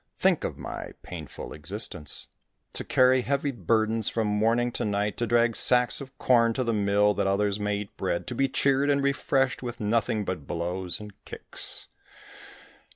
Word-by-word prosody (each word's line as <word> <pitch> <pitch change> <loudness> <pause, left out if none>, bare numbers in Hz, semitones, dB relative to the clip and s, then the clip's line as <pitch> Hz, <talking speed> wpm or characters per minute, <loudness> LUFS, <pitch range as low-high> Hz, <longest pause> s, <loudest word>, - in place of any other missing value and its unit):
Think - - +3
of - - -3
my - - -6
painful - - -8
existence! 75 -1 -4 0.5
To - - -2
carry 130 0 +4
heavy 140 +2 0
burdens 110 0 +1
from 115 -1 -1
morning 115 +4 +2
to - - -3
night, 105 0 0
to 120 - -1
drag 120 0 +3
sacks 125 -1 +3
of 135 -1 -10
corn 115 -2 +4
to 130 - -1
the 115 -1 0
mill, 105 0 +3
that 100 -1 0
others 100 +1 +1
may 105 0 0
eat 100 - -10
bread, 85 -2 -1
to - - -4
be 135 +2 +1
cheered 140 +1 +2
and 140 -1 +2
refreshed 135 -1 +1
with 120 -1 -5
nothing 110 0 0
but 85 -8 -4
blows 90 +2 -2
and 105 -1 -9
kicks. - - -6
110 Hz, 170 wpm, -27 LUFS, 100-125 Hz, 0.5 s, carry